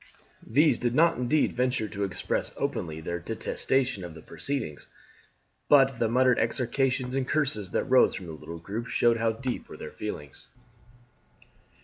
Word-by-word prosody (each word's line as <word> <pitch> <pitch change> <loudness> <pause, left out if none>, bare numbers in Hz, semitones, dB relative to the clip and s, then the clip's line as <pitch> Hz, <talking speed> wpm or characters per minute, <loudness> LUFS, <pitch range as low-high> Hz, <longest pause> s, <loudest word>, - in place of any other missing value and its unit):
These 140 +2 +4
did 120 0 0
not 165 +3 +4
indeed 135 +5 +2
venture 125 -3 0
to 100 -1 -4
express 95 -2 -2
openly 80 -1 -3
their 85 +2 -3
detestation 115 +3 -1
of 85 -2 -8
the 80 - -12
proceedings, 135 - -3 0.8
but 135 -3 +5
the 115 - +2
muttered 125 +1 +3
execrations 130 0 0
and 135 -1 -1
curses 135 -11 0
that - - 0
rose 130 -1 +4
from 95 - -6
the 85 - -7
little 80 +2 -8
group 105 +8 -5
showed 115 0 +3
how 115 0 +1
deep 125 +2 -4
were - - -9
their - - -7
feelings. 75 -10 -7
120 Hz, 155 wpm, -27 LUFS, 95-130 Hz, 0.8 s, but